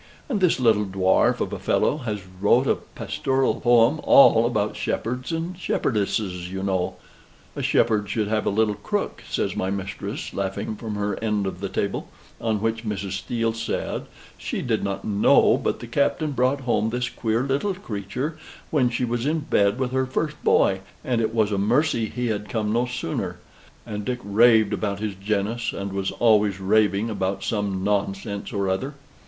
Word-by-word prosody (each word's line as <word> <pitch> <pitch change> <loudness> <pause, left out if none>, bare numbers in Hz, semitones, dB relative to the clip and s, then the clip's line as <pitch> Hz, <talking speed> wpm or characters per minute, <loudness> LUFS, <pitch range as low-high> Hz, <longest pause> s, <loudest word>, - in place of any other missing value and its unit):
And 220 -8 -1
this 180 -6 +3
little 110 -4 +4
dwarf 95 0 +2
of - - -2
a - - -4
fellow 150 - +1
has 110 -8 -4 0.2
wrote 120 +6 +4
a - - +4
pastoral 135 0 -1
poem 120 +4 +4
all 120 -4 +6
about 105 -3 -1
shepherds 125 +5 -3
and 165 +2 -3
shepherdesses, 100 - -1
you 95 0 -4
know." 95 -2 -1 0.6
"A - - -3
shepherd 105 -3 +2
should 105 +1 0
have 110 0 0
a - - +4
little 105 +1 +2
crook," - - -3
says - - -1
my 95 - -1
mistress, 100 0 -4
laughing 100 +2 -3
from 110 0 -5
her 105 +1 -2
end 105 -2 0
of 95 -2 -4
the 100 0 -3
table: 100 +1 -2 0.3
on 110 -2 0
which 115 0 -1
Mrs. 100 -3 -3
Steele 115 +4 -1
said, 115 0 -3 0.3
"She - - -3
did - - 0
not 100 0 -3
know, 105 -1 +4
but - - -2
the - - -6
Captain 140 +5 0
brought 130 +2 +1
home 110 -4 +1
this 125 +1 -1
queer 115 0 -1
little 140 +9 0
creature 130 - -4 0.3
when 130 -6 +3
she 120 +1 -1
was 120 +2 -1
in 160 +1 +1
bed 100 -7 +2
with 130 -2 -1
her 130 0 0
first 150 +3 -3
boy, 95 0 +3 0.3
and 120 -3 +1
it 110 - 0
was 110 -2 +1
a 100 - 0
mercy 115 +2 +2
he 125 0 -3
had 105 -1 -3
come 105 0 -1
no 120 +2 +1
sooner; 125 -9 -3 0.5
and 105 -1 -5
Dick 125 +3 -2
raved 110 +1 +4
about 100 -2 -1
his 105 -1 -2
genus, 105 +4 -1
and 100 0 -5
was 95 -1 -1
always 105 -4 +3
raving 105 +2 +2
about 95 -1 -2
some 100 -3 -1
nonsense 100 0 -2
or 100 -2 -1
other." 130 +10 -2
110 Hz, 180 wpm, -24 LUFS, 100-125 Hz, 0.6 s, all